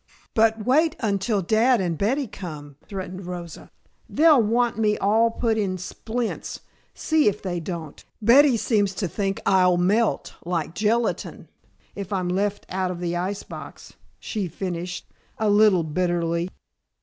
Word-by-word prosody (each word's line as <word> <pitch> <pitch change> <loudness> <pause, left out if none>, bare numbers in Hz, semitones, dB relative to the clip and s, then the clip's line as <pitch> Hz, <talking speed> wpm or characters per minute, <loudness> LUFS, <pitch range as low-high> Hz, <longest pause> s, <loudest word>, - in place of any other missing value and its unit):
"But 220 -1 +2
wait 310 +5 +3
until 200 -2 0
Dad 225 +6 +3
and 175 -3 -1
Betty 250 - 0
come," 150 - -8
threatened 185 -2 -6
Rosa. 175 -2 -7 0.4
"They'll 305 -4 +5
want 230 +1 +1
me 210 -1 +2
all 220 +4 +3
put 225 -1 0
in 190 -3 -1
splints, 225 +6 -4 0.3
see 315 -4 +2
if 210 0 0
they 180 -2 -2
don't. 165 -3 -7 0.2
Betty 250 +4 +6
seems 205 -4 +1
to 190 - -1
think 195 +3 -2
I'll 185 -2 +4
melt, 205 +6 +1
like 165 -2 -2
gelatine, 220 +4 -1 0.4
if 200 -1 -7
I'm 185 -3 -1
left 200 +3 -1
out 185 0 -2
of 180 -1 -5
the 175 -1 -2
ice 190 +3 -2
box," - - -10 0.3
she 205 -5 -3
finished, 180 0 -5 0.3
a 215 -1 +1
little 205 -4 +5
bitterly. 170 +1 -1
200 Hz, 145 wpm, -24 LUFS, 180-225 Hz, 0.4 s, Betty